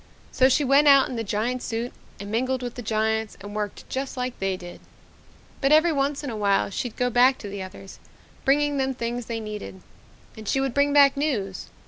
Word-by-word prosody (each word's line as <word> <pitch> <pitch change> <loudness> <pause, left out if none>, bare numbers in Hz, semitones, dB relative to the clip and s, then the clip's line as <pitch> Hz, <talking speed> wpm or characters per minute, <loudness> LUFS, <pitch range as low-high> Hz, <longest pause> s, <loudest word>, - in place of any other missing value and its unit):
So 260 0 +4
she 290 +3 +3
went 280 +2 +4
out 275 -1 +6
in 255 - -5
the 230 - -2
giant 225 +5 -2
suit 235 +1 -4 0.3
and 200 +1 -7
mingled 255 +3 -1
with 245 -1 -4
the 245 - -7
giants 220 0 -1
and 205 +1 -9
worked 210 -2 -4
just 265 0 -4
like 250 0 -3
they 195 -1 -1
did. 175 -1 -11 0.8
"But 275 0 +2
every 315 +2 +5
once 280 +1 -1
in 275 - -4
a - - -5
while 200 -1 +1
she'd 235 +3 -4
go 250 0 +1
back 250 +2 +5
to 205 - -8
the 200 0 -6
others, 190 +1 -10 0.4
bringing 290 +1 +2
them 265 -1 0
things 235 0 -4
they 230 -1 -3
needed. 210 -3 -7 0.6
And 220 -1 -10
she 270 - +1
would 270 -2 -1
bring 285 +1 +2
back 285 -1 +6
news. 225 - -2
245 Hz, 210 wpm, -25 LUFS, 210-270 Hz, 0.8 s, out